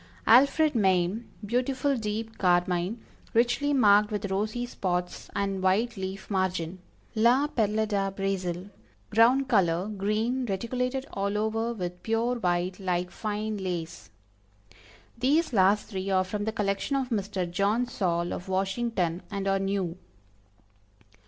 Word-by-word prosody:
Alfred 280 +6 +5
Mame, 190 0 +1 0.2
beautiful 260 +5 0
deep 220 0 -4
carmine, 180 +3 +1 0.3
richly 245 +5 +2
marked 210 -6 +5
with 205 -2 -3
rosy 215 +5 -1
spots 180 -6 -3
and 195 -1 -1
white 200 +6 +2
leaf 190 0 -5
margin. 185 -3 -1 0.3
La 240 +5 +4
Perle 220 -6 0
de 200 -2 0
Brazil, 195 -1 -3 0.4
ground 245 +5 +4
color, 185 -6 +2
green, 215 +5 -1
reticulated 250 +6 -2
all 200 +1 -1
over 225 +2 0
with 180 -5 -5
pure 230 +2 0
white, 180 -1 0
like 180 -2 -1
fine 215 0 -3
lace. 175 -3 -5 1.1
These 285 +4 +2
last 200 +1 +4
three 190 -2 -4
are 190 -1 +3
from 205 +2 -4
the 220 - 0
collection 210 +4 -1
of 265 -2 -1
Mr. 200 -5 -1
John 200 +7 +1
Saul 175 -7 -1
of 180 - -7
Washington, 190 -2 -1
and 200 -2 -3
are 195 0 +2
new. 195 -3 -2
205 Hz, 130 wpm, -27 LUFS, 185-230 Hz, 1.1 s, Alfred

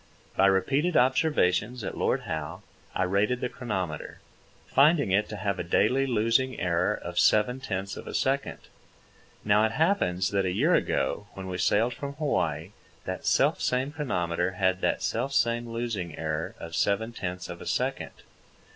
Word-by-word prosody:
By 95 - +5
repeated 135 - +2
observations 125 - +2
at - - -4
Lord - - 0
Howe 80 -2 -5 0.3
I 95 - +1
rated 100 +6 +1
the 125 - -2
chronometer, 95 - -4 0.5
finding 140 - +4
it 100 +3 +2
to 105 - -5
have 100 -2 -2
a - - -1
daily 125 +10 +2
losing 115 +2 +1
error 90 +3 +1
of 85 -2 -4
seven 115 +5 +3
tenths 100 -6 -4
of - - -9
a - - -5
second. 135 +1 0 0.9
Now 105 +1 +4
it 110 0 +1
happens 105 - +1
that 100 -1 +1
a 95 - 0
year 140 - +2
ago, 105 - 0
when 95 - -7
we 90 -1 -4
sailed 115 +4 +2
from 140 +2 -6
Hawaii, 85 - -1 0.3
that - - -4
selfsame 130 +3 +2
chronometer 90 - -1
had 95 0 +1
that - - 0
selfsame 120 -3 0
losing 115 -8 -3
error 80 0 -3
of 85 0 -7
seven 105 +6 0
tenths 90 -4 -5
of - - -8
a - - -8
second. - - -2
105 Hz, 160 wpm, -27 LUFS, 90-125 Hz, 0.9 s, By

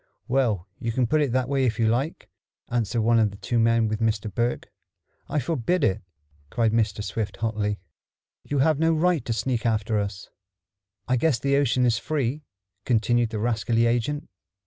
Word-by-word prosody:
"Well, 115 -8 +1
you 115 - -2
can 125 +2 +1
put 155 +6 +2
it 140 -4 +1
that 130 -1 +1
way 135 0 +1
if 115 -4 +1
you 115 - +2
like," 130 +8 -1 0.4
answered 115 -1 0
one 115 +1 +4
of 110 -2 +3
the 100 - -11
two 115 +4 -1
men 115 0 +3
with 110 0 -2
Mr. 110 -3 -1
Berg. 120 +3 -1 0.6
"I - - -1
forbid 155 +4 0
it!" 100 -4 +1 0.5
cried 115 +1 +1
Mr. 105 -2 0
Swift 105 -2 -3
hotly. 105 -2 -1 0.7
"You 145 - -3
have 150 +2 +3
no 165 +1 +3
right 165 -3 +2
to - - -3
sneak 115 +1 -1
after 110 -2 +1
us." 100 -2 -4 0.8
"I 130 - +2
guess 140 0 +2
the 140 +4 +1
ocean 130 -3 +2
is 120 -1 +2
free," 145 -1 -2 0.4
continued 120 0 +2
the 110 - -4
rascally 115 +1 +1
agent. 120 +5 0
115 Hz, 180 wpm, -25 LUFS, 110-135 Hz, 0.8 s, one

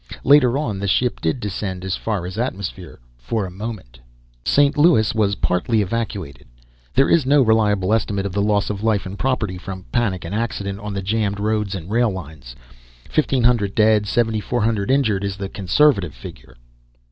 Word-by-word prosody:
Later 140 -3 +5
on 115 -10 -2
the 100 - -2
ship 120 +5 +1
did 80 +10 0
descend 95 -3 -4
as 95 0 -1
far 105 -6 -3
as 90 +4 -6
atmosphere, 100 - -4 0.2
for 100 - -2
a 90 - -7
moment... 95 - -8 0.4
St. 145 - +3
Louis 145 -8 +4
was 105 -3 +1
partly 100 +5 0
evacuated. 100 - -4 0.5
There 135 - +4
is 170 - +4
no 140 +1 +4
reliable 105 -3 +2
estimate 100 -3 0
of 100 - -3
the 100 - 0
loss 105 0 +1
of 100 -1 -5
life 105 -3 +1
and 95 +2 -7
property 110 -8 -1
from 95 0 -8
panic 100 -8 -1
and 85 - -6
accident 100 -3 -3
on 105 0 -6
the 95 - -3
jammed 100 0 -1
roads 105 -1 -1
and 85 -3 -7
rail 120 +1 +3
lines. 80 - -8 0.6
1500 120 -8 +2
dead, 110 -1 +3
7400 110 -1 0
injured 110 -8 +2
is 100 -1 -3
the 100 -1 -5
conservative 100 - +2
figure. - - -12
105 Hz, 170 wpm, -21 LUFS, 95-115 Hz, 0.6 s, Later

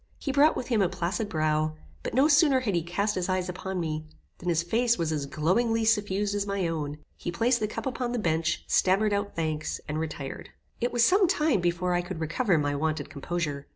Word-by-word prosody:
He 275 - -3
brought 290 +3 +4
with 250 - -4
him 225 -4 +2
a 185 - +3
placid 190 +4 -2
brow; 155 -1 0 0.3
but - - -4
no 270 +3 +5
sooner 290 -3 +5
had 215 -6 -1
he 170 - +1
cast 200 +5 -1
his 185 -1 -2
eyes 185 -1 0
upon 185 +1 -4
me, 155 -2 -3 0.3
than 180 - -3
his 170 -1 +2
face 235 +6 +2
was 165 -2 -1
as 145 -3 -2
glowingly 225 +10 +1
suffused 205 -2 +1
as 205 0 -1
my 200 -3 0
own. 150 -3 -3 0.2
He 175 - -4
placed 235 +7 +2
the 215 - 0
cup 215 - -6
upon 250 -2 -2
the 245 - -1
bench, 160 -5 0
stammered 200 +3 +3
out 200 0 -2
thanks, 155 -2 -2
and 155 +1 -2
retired. 150 -4 -5 0.3
It 240 - 0
was 240 -1 +4
some 380 +1 +4
time 305 - +2
before 175 +1 0
I 175 - +2
could 175 -1 -6
recover 170 +4 +1
my 145 -1 0
wonted 155 +2 -2
composure. 145 -2 -3
185 Hz, 220 wpm, -27 LUFS, 160-225 Hz, 0.3 s, no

